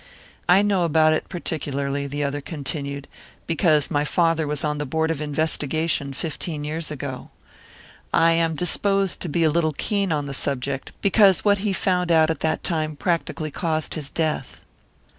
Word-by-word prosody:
"I 190 +3 +6
know 200 -3 +2
about 155 -1 +4
it 155 - -2
particularly," 140 -5 -3
the 145 +1 -3
other 145 +1 -2
continued, 140 -2 -4 0.4
"because 155 -3 +2
my 145 0 +2
father 165 0 +1
was 150 0 -1
on 150 -1 -1
the 150 - -2
board 160 +4 0
of 155 -2 -3
investigation 150 0 0
fifteen 155 +1 -4
years 155 +2 -3
ago. 140 -3 -6 0.8
I 165 0 +4
am 165 -1 +1
disposed 195 +3 +1
to 175 - -4
be 165 +3 +1
a 155 - +4
little 160 -1 +1
keen 200 +4 -1
on 150 -2 0
the 140 - -5
subject, 135 0 -2
because 200 -2 +5
what 205 -1 +4
he 205 +1 -1
found 180 -2 0
out 160 -1 +5
at 160 - -4
that 160 0 -1
time 155 -3 -1
practically 160 -1 -2
caused 160 -1 -1
his 150 -3 -3
death." 155 -5 -2
155 Hz, 170 wpm, -23 LUFS, 145-170 Hz, 0.8 s, I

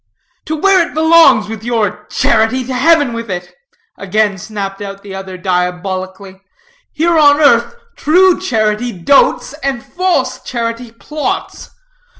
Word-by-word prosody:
"To 315 - -3
where 370 +1 +3
it - - -13
belongs 315 -9 +5
with 220 0 -7
your 210 -3 -2
charity! 225 +3 +1
to 260 - -5
heaven 290 -1 +3
with 230 -1 -6
it!" 180 -1 -6 0.5
again 200 0 0
snapped 200 -1 -6
out 195 -1 -8
the 200 -1 -9
other, 190 -1 -7
diabolically; 185 +1 -4 0.5
"here 330 +1 +1
on 290 -1 +5
earth, 240 - +3 0.2
true 365 +3 +3
charity 220 - -1
dotes, 280 - +2
and 270 -3 -3
false 285 -9 -1
charity 235 -1 -5
plots. 300 +6 -5
230 Hz, 135 wpm, -14 LUFS, 195-295 Hz, 0.5 s, belongs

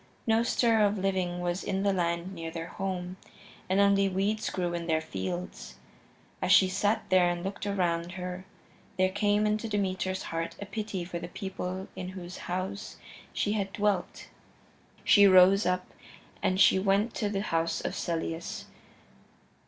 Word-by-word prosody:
No 225 0 +3
stir 230 -1 +3
of 205 0 +2
living 185 -2 -1
was 175 +1 -2
in 195 0 -1
the 200 -1 +2
land 170 0 -1
near 165 -2 -5
their 165 0 -5
home, 185 -1 -4 0.5
and 190 +1 +2
only 200 -1 +4
weeds 200 +3 0
grew 175 -2 -2
in 170 -1 -3
their 160 -1 +2
fields. 160 - -5 0.7
As 185 0 +1
she 190 -1 +7
sat 205 +4 +1
there 185 -1 +5
and 175 0 -3
looked 195 +1 -4
around 175 -3 0
her 180 0 -6 0.5
there 185 0 +3
came 205 +1 +2
into 215 +1 0
Demeter's 190 -2 -1
heart 165 0 -3
a 200 - -5
pity 200 -3 -4
for 170 -1 -5
the - - -6
people 190 0 -5
in 185 -1 -5
whose 180 0 -8
house 185 +3 -4 0.3
she 205 - -1
had 200 -2 -1
dwelt. 205 -4 -1 0.8
She 200 -1 +7
rose 190 +2 +6
up 180 0 -1 0.5
and 185 0 +1
she 190 - +6
went 200 +4 +2
to 210 - -1
the 200 -1 -1
house 165 -3 0
of - - -3
Celeus. 165 0 -3
190 Hz, 160 wpm, -29 LUFS, 175-200 Hz, 0.8 s, she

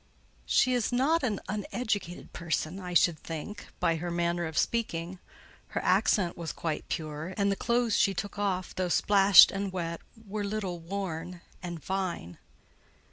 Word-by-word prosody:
"She 255 - +4
is 245 -2 0
not 280 +7 +2
an 220 -6 -1
uneducated 205 -2 -3
person, 170 +1 -2
I 180 -2 -6
should 170 -1 +4
think, 170 +6 -7
by 165 -2 +2
her 175 +2 -4
manner 170 0 0
of 160 - -7
speaking; 180 -6 -1 0.6
her - - -1
accent 180 -5 +2
was 165 -2 -4
quite 160 -2 -4
pure; 155 +3 -4
and 200 -1 +2
the - - +1
clothes 235 0 +1
she 195 - +3
took 205 +2 -4
off, 190 -3 -1
though 185 -1 -1
splashed 195 +1 +7
and 195 0 -3
wet, 170 -2 -4 0.3
were 205 +1 -3
little 200 -4 -3
worn 175 -1 -5 0.2
and 175 -4 -6
fine." 185 - -3
185 Hz, 155 wpm, -29 LUFS, 170-205 Hz, 0.6 s, splashed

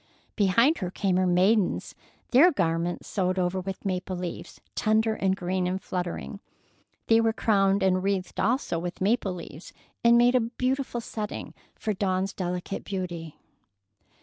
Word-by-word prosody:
Behind 230 - +3
her 180 -4 -2
came 190 0 0
her 185 0 +2
maidens, 185 +3 +2 0.4
their 290 +8 +7
garments 170 - -1
sewed 185 -2 -1
over 180 +1 0
with 190 +2 -6
maple 185 0 -2
leaves, 175 -1 -6
tender 220 +1 +2
and 190 -3 0
green 180 0 -1
and 185 +1 -1
fluttering. 180 +2 -4 0.7
They 225 0 +5
were 225 0 +2
crowned 195 -3 +2
and 185 -1 +3
wreathed 195 -1 -2
also 235 -7 0
with 175 +1 -5
maple 200 -1 +1
leaves, 170 -1 -10 0.3
and 235 0 +6
made 240 +1 +5
a 255 - +5
beautiful 255 +1 -2
setting 215 -2 -5 0.2
for 215 - -2
Dawn's 190 0 -1
delicate 180 +1 -4
beauty. 175 -5 -5
190 Hz, 150 wpm, -27 LUFS, 180-220 Hz, 0.7 s, their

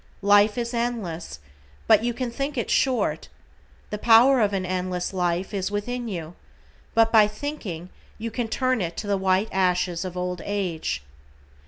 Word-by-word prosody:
Life 205 +2 +5
is 235 0 -2
endless, 225 - -3 0.5
but - - +5
you 240 - +1
can 240 0 -4
think 275 +3 -3
it 235 - -1
short, 260 -2 +1 0.6
"The 210 - -3
power 240 +4 +6
of 205 -2 +2
an 190 -2 -1
endless 180 0 -2
life," 180 +1 -1
is 190 -1 -1
within 240 +4 -3
you, 170 -5 -5 0.6
but 225 0 +4
by 215 -2 +6
thinking 210 - -6 0.3
you 230 +1 -5
can 235 +1 -2
turn 255 0 0
it 170 -1 -3
to - - -4
the 205 -1 +1
white 190 +2 +1
ashes 180 -2 +1
of 180 -1 -6
old 180 -1 -3
age. 175 - -2
205 Hz, 165 wpm, -24 LUFS, 180-235 Hz, 0.6 s, power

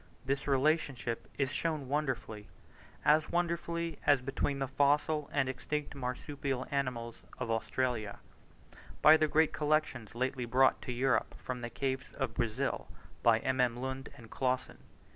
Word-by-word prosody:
This 140 +1 -1
relationship 135 -4 +1
is 135 -1 0
shown 155 -3 -2
wonderfully 130 -7 -2 0.6
as 150 +1 +4
wonderfully 170 -1 -1
as 145 -2 +5
between 135 +2 -1
the 135 -1 -1
fossil 145 +2 +2
and 135 -2 +1
extinct 145 +3 -3
Marsupial 135 0 -3
animals 125 -4 -2 0.2
of 120 -3 -3
Australia 115 -1 -1 0.9
by 155 +1 +10
the 155 -1 +3
great 155 +1 +3
collection 150 -6 0
lately 125 0 -1
brought 130 +3 +4
to - - -4
Europe 130 +2 +1
from 125 -1 -5
the 120 - -4
caves 130 +2 -3
of 135 -5 -2
Brazil 120 +4 -1 0.3
by 115 -1 +4
MM. 125 -2 +1
Lund 130 +1 -4
and 115 -2 -13
Clausen. 130 -1 -1
135 Hz, 140 wpm, -32 LUFS, 125-145 Hz, 0.9 s, by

